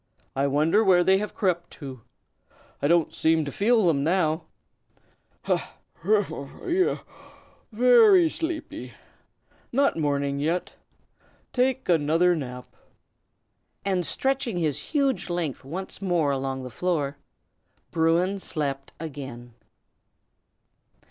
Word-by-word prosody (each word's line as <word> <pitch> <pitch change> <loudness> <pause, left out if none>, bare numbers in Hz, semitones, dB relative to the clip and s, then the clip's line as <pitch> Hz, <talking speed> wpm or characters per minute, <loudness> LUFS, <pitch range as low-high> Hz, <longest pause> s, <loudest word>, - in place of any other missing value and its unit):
I 135 +1 +1
wonder 155 +9 +3
where 180 -3 +5
they 190 +2 +4
have 210 0 -5
crept 175 -3 0
to! 135 -5 -9 0.8
I - - +2
don't 170 0 +3
seem 160 -1 +2
to 140 - -4
feel 220 - +3
them 145 -5 +2
now. 160 -1 +1 1.0
Ha! - - -1 0.3
humph! 195 -7 0 0.2
Yaow! 370 +1 +1 0.7
very 330 - +6
sleepy! 320 0 -5 0.8
Not 275 -5 +2
morning 140 -2 0
yet; 165 +5 -1 0.8
take 260 +1 +1
another 165 +2 +3
nap." 125 -4 -7 1.1
And 190 -2 +1
stretching 265 0 -1
his 155 -5 0
huge 275 - 0
length 170 -6 -2
once 185 +8 -6
more 175 -6 +1
along 135 -1 -2
the 125 - -7
floor, 145 -2 -1 0.7
Bruin 170 +4 +2
slept 140 -6 -4
again. 130 -6 -8
170 Hz, 110 wpm, -26 LUFS, 140-200 Hz, 1.1 s, very